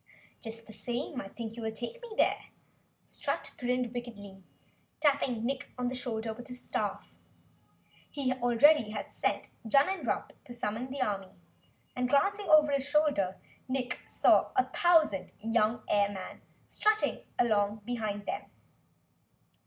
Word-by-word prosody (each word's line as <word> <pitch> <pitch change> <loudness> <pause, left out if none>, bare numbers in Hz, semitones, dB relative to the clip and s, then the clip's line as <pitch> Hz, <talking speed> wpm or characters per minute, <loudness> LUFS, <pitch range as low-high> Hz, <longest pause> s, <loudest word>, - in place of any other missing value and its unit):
"Just 225 -1 -7
the 220 - -12
same 240 +5 -3
I - - -8
think 225 +2 -7
you 235 - -7
will 220 0 -2
take 240 - -6
me 480 - -9
there!" - - +2 0.6
Strut - - -3
grinned 250 -1 0
wickedly, 205 -6 -7 0.6
tapping 275 -6 +2
Nick 260 +1 -2
on 250 -1 0
the - - -4
shoulder 230 -3 -3
with 245 +2 -11
his 250 0 -8
staff. - - -3 1.0
He 270 -3 0
already 245 +1 +5
had 210 -1 -5
sent - - -1
Junnenrump 280 - +1
to 245 - -9
summon 235 +2 -3
the 270 0 -1
army, 195 -4 -3 0.6
and, 250 0 0
glancing 400 +9 +2
over 305 -1 +7
his 280 0 0
shoulder, 285 -11 +2 0.3
Nick 255 -1 -2
saw - - +4
a 385 - +4
thousand 310 - +3
young 225 +1 +1
airmen 200 -2 0 0.2
strutting 430 0 +1
along 210 -2 +2
behind 215 -4 -3
them. - - -3
245 Hz, 135 wpm, -31 LUFS, 220-275 Hz, 1.0 s, over